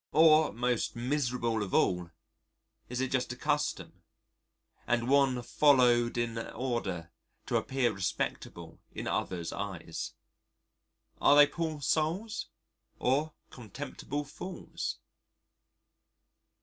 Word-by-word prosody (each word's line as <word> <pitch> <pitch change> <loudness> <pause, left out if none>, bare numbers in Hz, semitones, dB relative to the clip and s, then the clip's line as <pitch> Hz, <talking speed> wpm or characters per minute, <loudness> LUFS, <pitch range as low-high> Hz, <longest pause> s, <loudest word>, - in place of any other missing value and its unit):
Or 155 0 +6
most 120 +2 -1
miserable 120 -3 0
of 100 -3 -2
all 90 -2 +2 0.8
is 125 +1 -2
it 130 - -1
just 130 -2 0
a - - -9
custom, 150 +3 -2 0.9
and 120 0 +1
one 135 -2 +3
followed 120 -4 +4
in 115 -1 -1
order 110 -10 -3 0.3
to - - +1
appear 130 -2 0
respectable 95 -2 -4
in - - -6
others' 85 -3 -2
eyes? 90 -5 -5 1.1
Are 145 - +6
they 145 0 +9
poor 155 0 -3
souls? 165 - 0 0.5
or 145 +5 +1 0.2
contemptible 130 +5 -6
fools? 170 +5 -6
125 Hz, 100 wpm, -31 LUFS, 115-145 Hz, 1.1 s, they